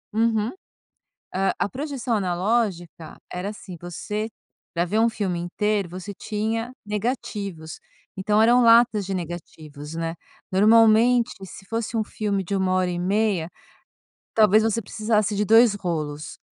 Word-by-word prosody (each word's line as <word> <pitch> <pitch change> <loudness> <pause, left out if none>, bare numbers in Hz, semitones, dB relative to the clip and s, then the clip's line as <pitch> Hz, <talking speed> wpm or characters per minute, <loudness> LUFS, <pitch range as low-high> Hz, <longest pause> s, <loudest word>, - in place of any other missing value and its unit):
Uhum. 225 -1 +1 0.8
Ah, 195 +1 +1
a - - +1
projeção 265 -2 -3
analógica 185 -3 -1
era 180 +3 -3
assim, 195 -4 -9
você 210 +5 -4 0.4
pra 170 +1 +1
ver 215 +5 0
um 230 +1 +4
filme 195 -6 -2
inteiro, 200 +2 -1
você 185 +3 -7
tinha 220 +4 -3
negativos, 205 -6 -4 0.4
então 210 +3 +2
eram 240 +2 +5
latas 230 -3 +5
de 195 - -3
negativos, 160 -3 -7
né. 165 0 -3 0.4
Normalmente, 225 +4 +5
se 195 +1 -12
fosse 225 +1 -3
um 220 - +1
filme 205 -2 -2
de 195 +3 -3
1 190 -1 +1
hora 185 -1 +1
e 175 - -3
meia, 190 -3 0 0.8
talvez 215 0 +5
você 225 +1 +1
precisasse 215 0 0
de 210 +1 +1
2 225 0 +6
rolos, 155 -6 -4
205 Hz, 140 wpm, -24 LUFS, 180-225 Hz, 0.8 s, 2